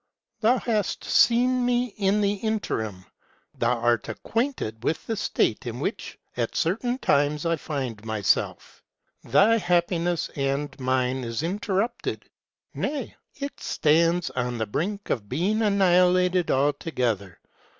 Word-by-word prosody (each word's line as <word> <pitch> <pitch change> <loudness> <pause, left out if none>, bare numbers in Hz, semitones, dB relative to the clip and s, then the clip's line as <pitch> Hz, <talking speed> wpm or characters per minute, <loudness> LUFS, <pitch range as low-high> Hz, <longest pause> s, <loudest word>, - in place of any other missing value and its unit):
Thou 230 +4 +4
hast 215 -5 -1
seen 250 +1 +3
me 245 -2 +1
in 200 +1 +2
the 200 0 +2
interim; 175 - -3 0.5
thou 120 +1 +2
art 120 -1 +1
acquainted 225 - -3
with 160 - -1
the 225 - -2
state 210 - 0
in - - -4
which, - - -4 0.2
at - - -2
certain 230 +9 0
times, 145 - +1
I 165 0 +2
find 130 -9 -4
myself: 110 -3 -1 0.4
thy 225 +3 +4
happiness 175 -1 0
and 140 0 -1
mine 130 0 0
is 115 +4 -3
interrupted, 200 +5 -2 0.5
ŌĆö - - -5
nay, 280 -3 -3 0.2
it 280 0 -6
stands 165 +3 +2
on 125 -1 -2
the 110 - -1
brink 195 - -3
of 105 -5 -2
being 190 - 0
annihilated 180 -3 +3
altogether. 125 - 0
175 Hz, 130 wpm, -25 LUFS, 130-210 Hz, 0.5 s, Thou